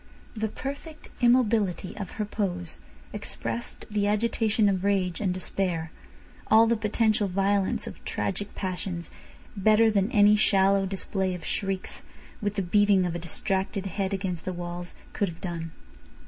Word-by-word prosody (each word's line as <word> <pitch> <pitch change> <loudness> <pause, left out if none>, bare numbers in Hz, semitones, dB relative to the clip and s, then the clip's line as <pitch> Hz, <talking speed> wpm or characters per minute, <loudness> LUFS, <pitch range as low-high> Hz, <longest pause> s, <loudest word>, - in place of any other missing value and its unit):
The 220 0 -1
perfect 285 +7 -7
immobility 220 -7 +3
of 200 -4 -6
her 210 - -2
pose 180 -5 -3 0.3
expressed 235 - -5
the 205 -2 0
agitation 220 0 +2
of 190 -2 +1
rage 190 -3 +1
and 195 -3 +1
despair, 180 -3 -2 0.6
all 220 +1 +7
the 230 +1 +3
potential 215 -1 +1
violence 195 +1 +1
of - - -9
tragic 205 +1 -3
passions, 180 -2 -4 0.4
better 215 +2 +5
than 200 +2 +1
any 210 -1 +6
shallow 195 -2 +3
display 190 -1 -1
of 180 - -8
shrieks, 195 -2 -2 0.4
with 205 -1 -1
the 200 - 0
beating 200 +1 +4
of 175 - -1
a 170 - -3
distracted 190 +4 -2
head 195 +1 -2
against 185 -4 -3
the 185 - -3
walls, 175 0 -6 0.2
could 200 - 0
have 165 0 -10
done. 170 -3 -4
195 Hz, 145 wpm, -27 LUFS, 185-210 Hz, 0.6 s, all